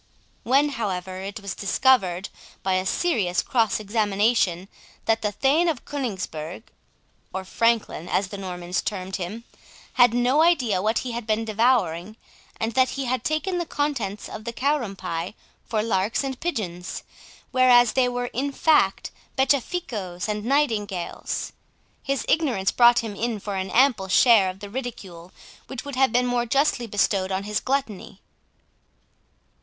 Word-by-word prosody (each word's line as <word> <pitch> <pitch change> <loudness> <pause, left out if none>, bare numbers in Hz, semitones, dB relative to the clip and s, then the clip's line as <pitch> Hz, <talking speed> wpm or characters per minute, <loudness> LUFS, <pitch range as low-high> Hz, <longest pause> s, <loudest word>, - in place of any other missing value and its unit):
When, 275 +4 +3
however, 190 -7 -4
it 200 +3 -6
was 200 -1 -4
discovered, 195 -4 +2 0.3
by 190 - +1
a 185 0 0
serious 200 - +1
cross 225 -4 +1
examination, 205 -3 +1 0.4
that 225 0 +2
the 210 - 0
Thane 280 - +2
of 295 -7 -3
Coningsburgh 190 - -4 0.7
(or 190 0 -5
Franklin, 230 -5 0
as 195 -1 0
the 200 - -6
Normans 180 -1 -3
termed 190 -2 -4
him) 195 +6 -5 0.6
had 245 -2 +7
no 250 +5 +3
idea 255 - +3
what 220 +3 +1
he 250 - -3
had 230 -1 -5
been 220 +1 0
devouring, 215 -4 +1 0.4
and 225 +1 -1
that 260 +1 +3
he 275 - -2
had 250 -1 -1
taken 350 +5 -1
the 345 - -2
contents 270 - -2
of 215 - -8
the 235 - -4
Karum 255 -5 0
pie 175 +2 -4 0.3
for 215 -2 -1
larks 210 +2 0
and 265 -2 -4
pigeons, 190 - -4 0.5
whereas 245 -2 +5
they 255 -1 +3
were 245 0 -3
in 280 +3 -1
fact 310 +2 +2 0.3
beccaficoes 250 - -1
and 210 -1 -2
nightingales, 220 -9 -1 0.5
his 275 -1 -2
ignorance 250 -12 +1
brought 240 0 +5
him 215 -3 -5
in 230 0 -2
for 200 0 -5
an 190 0 -3
ample 240 -4 +3
share 205 -1 +5
of 185 +1 -9
the 205 - -7
ridicule 200 -9 -7 0.4
which 265 0 -7
would 285 -2 -5
have 265 -2 +3
been 245 +1 +2
more 245 -1 0
justly 270 -1 +1
bestowed 200 -2 +1
on 190 +1 -1
his 210 +1 -1
gluttony. 255 -8 -3
225 Hz, 150 wpm, -24 LUFS, 190-255 Hz, 0.7 s, had